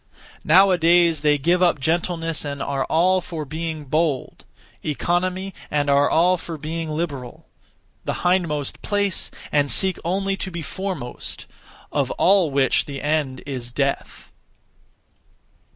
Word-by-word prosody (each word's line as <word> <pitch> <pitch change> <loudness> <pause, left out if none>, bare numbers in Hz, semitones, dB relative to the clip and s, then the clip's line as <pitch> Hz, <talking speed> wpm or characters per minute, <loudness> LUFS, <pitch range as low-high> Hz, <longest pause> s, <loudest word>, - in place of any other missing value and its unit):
Now 195 +1 +6
a 180 - +2
days 170 -2 +4
they 150 -1 +3
give 175 +6 +2
up 175 -4 +3
gentleness 165 +1 -1
and 140 -1 -4
are 140 -1 -1
all 185 +3 +3
for 160 -3 -6
being 160 +1 -5
bold; 150 -1 -1 0.4
economy, 180 +5 -1 0.2
and 145 -1 +1
are 140 +1 +4
all 180 +3 +3
for 165 -1 -7
being 160 +2 -4
liberal; 150 -6 -4 0.6
the - - -2
hindmost 170 -6 0
place, 205 -2 -1 0.2
and 145 -1 +2
seek 190 +4 +2
only 195 +3 0
to 190 - -4
be 170 -2 -6
foremost; 180 -7 -5 0.5
(of - - 0
all 190 -3 +4
which 135 -2 +2
the 140 -1 -6
end 145 -3 -1
is) 125 -4 -5
death. 140 +2 -3
160 Hz, 135 wpm, -22 LUFS, 145-180 Hz, 0.6 s, Now